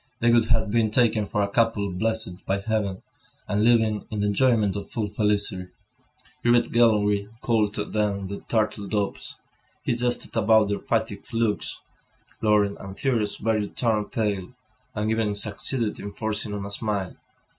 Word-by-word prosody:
They 120 0 +4
would 115 -1 +5
have 110 -2 +1
been 115 -1 +2
taken 110 -2 +2
for 105 - 0
a - - +1
couple 105 -2 +1
blessed 110 -1 -3
by 95 +1 +1
heaven, 105 -3 -2 0.4
and 105 +1 +1
living 110 -2 +3
in 105 -2 -3
the - - +1
enjoyment 105 -1 +2
of 100 -1 -5
full 110 -3 -2
felicity. 105 -3 0 0.8
Grivet 120 0 +3
gallantly 105 -3 +3
called 110 -3 +1
them 105 -1 -1
the 100 +1 -5
"turtle 110 -2 0
doves." 105 -1 -2 0.5
When - - +1
he - - -5
jested 120 0 0
about 110 -1 +4
their 100 - -1
fatigued 110 -3 -2
looks, 115 -2 -1 0.6
Laurent 105 -2 +2
and 95 0 -8
Thérèse 110 -4 -1
barely 110 -2 +1
turned 110 -4 0
pale, 105 -2 -2 0.4
and 105 +1 0
even 110 -2 0
succeeded 105 +2 -1
in 100 - -6
forcing 110 0 -2
on 100 -1 -4
a 100 - -6
smile. 100 -3 -2
105 Hz, 160 wpm, -25 LUFS, 100-115 Hz, 0.8 s, would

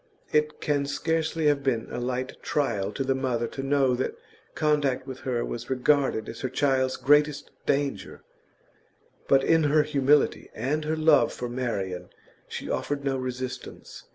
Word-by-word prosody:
It 150 0 +1
can 145 -1 0
scarcely 160 +2 -1
have 145 -1 +3
been 125 -5 0
a - - -3
light 130 +1 -3
trial 105 -9 -1
to 135 - -2
the 135 0 +1
mother 130 -3 -1
to 135 - -5
know 135 -1 +2
that 125 +1 -2 0.4
contact 145 -4 +1
with 130 -1 -7
her 120 -3 -1
was 120 0 -6
regarded 130 -3 +2
as 115 - -7
her 130 - -2
child's 130 0 +1
greatest 145 +2 +3 0.2
danger; 140 -8 -1 1.0
but 135 -1 +4
in 160 +1 +4
her 150 +1 +4
humility 145 -1 +2
and 145 +7 -1
her 160 +1 -1
love 155 -1 +4
for 125 - -5
Marian 115 -7 -3 0.4
she - - -6
offered 140 -1 -2
no 135 -1 +1
resistance. 130 0 -6
135 Hz, 155 wpm, -26 LUFS, 125-150 Hz, 1.0 s, but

